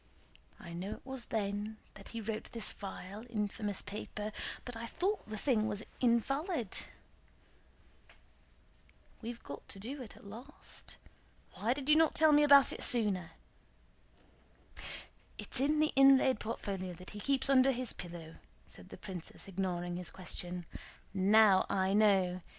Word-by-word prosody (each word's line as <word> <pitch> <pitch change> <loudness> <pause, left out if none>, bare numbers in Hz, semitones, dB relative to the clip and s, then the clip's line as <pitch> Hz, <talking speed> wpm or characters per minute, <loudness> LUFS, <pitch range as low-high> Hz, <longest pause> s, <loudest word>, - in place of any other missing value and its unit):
I 170 - -9
know 185 +5 -4
it - - -12
was 265 -2 -3
then 210 0 -2 0.3
he 230 - -5
wrote 220 0 -4
this 230 -2 -1
vile, 200 +1 -7
infamous 210 -2 -2
paper, 210 +1 -5 0.3
but 245 - -6
I 230 +1 -5
thought 380 - -1
the 215 - -4
thing 220 -4 +2
was 205 0 -2 0.2
invalid." 255 - 0 2.4
"We've 235 +1 -6
got 140 - -8
to 245 +8 -6
it 230 - -10
at - - -16
last—why 230 -2 -7
did 280 -1 -6
you 300 - +7
not 320 0 +4
tell 315 -1 +6
me 295 0 +6
about 280 -2 +7
it - - -7
sooner?" 205 -8 +3 2.0
"It's - - -4
in 295 +3 +2
the 310 0 +2
inlaid 270 -3 +6
portfolio 195 -4 -4
that 180 +2 -11
he 210 - -7
keeps 270 +5 +1
under 270 -1 +6
his 255 -1 -2
pillow," 170 -2 -8 0.3
said - - -11
the - - -9
princess, 185 0 -8
ignoring 175 -2 -2
his 180 - -3
question. 180 -1 -5 0.5
"Now 200 0 +5
I 190 0 +1
know! 190 -4 +4
215 Hz, 140 wpm, -34 LUFS, 190-260 Hz, 2.4 s, you